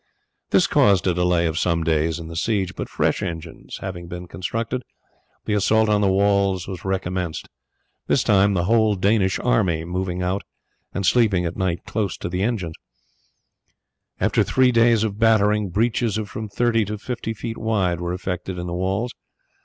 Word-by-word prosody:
This - - +4
caused 100 -4 +3
a 90 - +2
delay 90 -1 +2
of 80 -1 -1
some 85 -2 +1
days 80 0 +1
in 85 -1 -7
the 85 - -8
siege, 95 +1 0
but - - -6
fresh - - 0
engines 80 -2 -6
having 90 -3 -6
been 90 +1 -7
constructed, 115 +8 -3 0.6
the 105 - -1
assault 110 +2 +3
on 105 -1 +3
the 100 -2 +3
walls 100 -2 +2
was 95 -3 -6
recommenced, 90 -3 -3 0.6
this - - +2
time 100 0 +3
the 85 - +1
whole 110 +1 +3
Danish 100 0 +2
army 80 +6 +1
moving 90 0 -3
out 95 +2 -1 0.5
and 100 - -3
sleeping 105 -7 +3
at 85 - -3
night 95 -3 -1
close 105 -4 -2
to - - -5
them. 100 +7 0 1.6
After - - +2
three 130 -1 +3
days' 115 -2 +4
battering, 105 -1 +2
breaches 110 +2 0
of 105 -1 -4
from 110 -4 -5
thirty 115 +1 +1
to 105 +2 -4
fifty 115 0 -4
feet 115 +2 -5
wide 95 -6 0
were 85 0 -2
effected 90 0 -4
in 90 - -4
the 85 - -4
walls. 95 +7 -1
95 Hz, 170 wpm, -22 LUFS, 90-110 Hz, 1.6 s, This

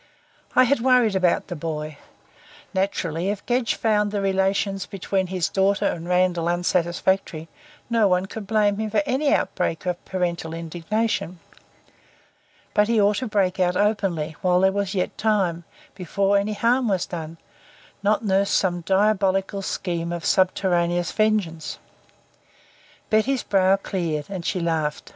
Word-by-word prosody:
I 255 - +7
had 270 +2 +2
worried 245 -4 +3
about 185 -2 +2
the 175 - -6
boy. 155 -2 -5 0.7
Naturally, 185 -2 -1
if 205 -1 -4
Gedge 245 -1 0
found 210 -2 +1
the 205 0 -2
relations 195 0 0
between 195 -1 -2
his 185 -2 -1
daughter 195 +1 +1
and 170 +1 -2
Randall 180 -2 +2
unsatisfactory, 175 -1 0 0.4
no 230 -3 +3
one 180 0 +1
could 200 +1 -8
blame 210 -1 +2
him 220 0 -2
for 210 -1 +1
any 280 +3 +1
outbreak 165 - -1
of 180 -1 -3
parental 170 -3 -3
indignation. 175 +3 -2 1.4
But 210 0 +3
he 230 -1 +2
ought 205 0 +3
to 255 - -2
break 195 -3 0
out 180 -1 +2
openly, 190 -7 0
while 180 0 +3
there 190 0 +4
was 200 0 -2
yet 180 - -1
time 190 -6 0 0.3
before 195 +2 0
any 200 +2 +1
harm 240 +4 +2
was 190 -4 0
done 165 -1 -7 0.6
not 210 +3 +1
nurse 195 0 +2
some 175 -2 +1
diabolical 195 +1 +1
scheme 170 -3 -3
of 170 -1 -5
subterraneous 175 -2 +1
vengeance. 210 -7 0 1.3
Betty's 240 +5 +2
brow 190 -1 +3
cleared, 170 -5 -3
and 185 -3 -4
she 185 - -1
laughed. 160 -3 -2
190 Hz, 145 wpm, -23 LUFS, 175-210 Hz, 1.4 s, I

